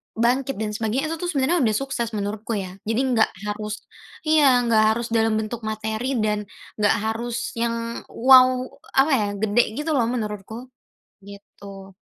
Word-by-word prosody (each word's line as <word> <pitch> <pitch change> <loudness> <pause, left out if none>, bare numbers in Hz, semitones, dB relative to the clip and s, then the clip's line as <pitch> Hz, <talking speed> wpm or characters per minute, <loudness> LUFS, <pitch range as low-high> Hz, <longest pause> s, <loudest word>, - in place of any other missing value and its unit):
bangkit 250 +1 0
dan 210 -1 -3
sebagainya, 230 +7 -1
itu 325 +1 -4
tuh 350 - -1
sebenernya 285 +4 +1
udah 220 - +3
sukses 245 -1 -2
menurutku 210 +2 -4
ya. 185 -1 -7
Jadi 225 +3 0 0.2
nggak 220 - +3 0.2
harus 210 +1 -5 0.4
iya 285 -5 +5
...nggak 220 -2 +4
harus 235 0 -3
dalam 225 -1 +2
bentuk 220 +1 -5
materi 220 +4 -2
dan 210 -1 0 0.3
nggak 210 +1 +3
harus 230 +2 -3
yang 230 0 -3
wow 255 0 +6 0.3
apa 275 +3 +3
ya? 210 -4 0
Gede 220 +3 +3 0.2
gitu 305 +2 -2
loh 245 - +3
menurutku. 220 +1 -5 0.6
Gitu. 200 -1 -12
225 Hz, 155 wpm, -23 LUFS, 215-255 Hz, 0.6 s, wow